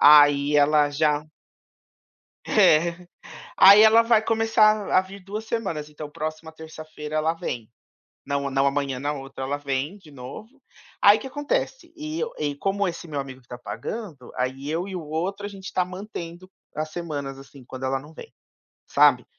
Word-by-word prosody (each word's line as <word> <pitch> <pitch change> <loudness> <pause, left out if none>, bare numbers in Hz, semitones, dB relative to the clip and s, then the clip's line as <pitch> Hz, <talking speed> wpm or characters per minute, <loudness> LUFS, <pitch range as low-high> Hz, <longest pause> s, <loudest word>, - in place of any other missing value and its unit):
Aí 145 0 +7
ela 145 0 +4
já 150 0 +1 1.3
É. 170 +3 +3 0.5
Aí 200 +2 +9
ela 220 +1 +7
vai 230 -1 +3
começar 220 -2 +3
a 185 - +6
vir 190 +1 -11
2 210 +3 -6
semanas, 190 -10 -3
então 150 0 -8
próxima 155 +1 -6
terça-feira 155 -1 -9
ela 160 +1 +1
vem. 125 -10 -5 0.6
Não 140 -1 -1
não 135 +1 +2
amanhã, 140 -2 -1
na 145 +2 -2
outra 135 -1 -7
ela 140 +2 -2
vem 145 +6 -3
de 160 -6 -17
novo. 215 - -11 0.4
Aí 205 +1 +7
o - - -12
que - - -8
acontece? 295 - -3
E 310 +1 -5
eu 470 - -2
e 145 -1 -1
como 200 +4 0
esse 175 0 -6
meu 145 -2 -3
amigo 130 -1 -8
que - - -32
tá 120 - -8
pagando, 130 - -7
aí 130 +3 -3
eu 170 +4 -2
e 190 - -7
o 175 - -5
outro, 175 +7 -3
a - - -4
gente 195 -1 -9
tá 180 - +1
mantendo 180 -2 -8 0.2
as 155 +1 -3
semanas, 145 -6 -5
assim, 135 -1 -14
quando 130 +1 -8
ela 135 0 0
não 150 +3 -14
vem, 455 - -11 0.6
sabe. - - +4
155 Hz, 175 wpm, -24 LUFS, 140-200 Hz, 1.3 s, Aí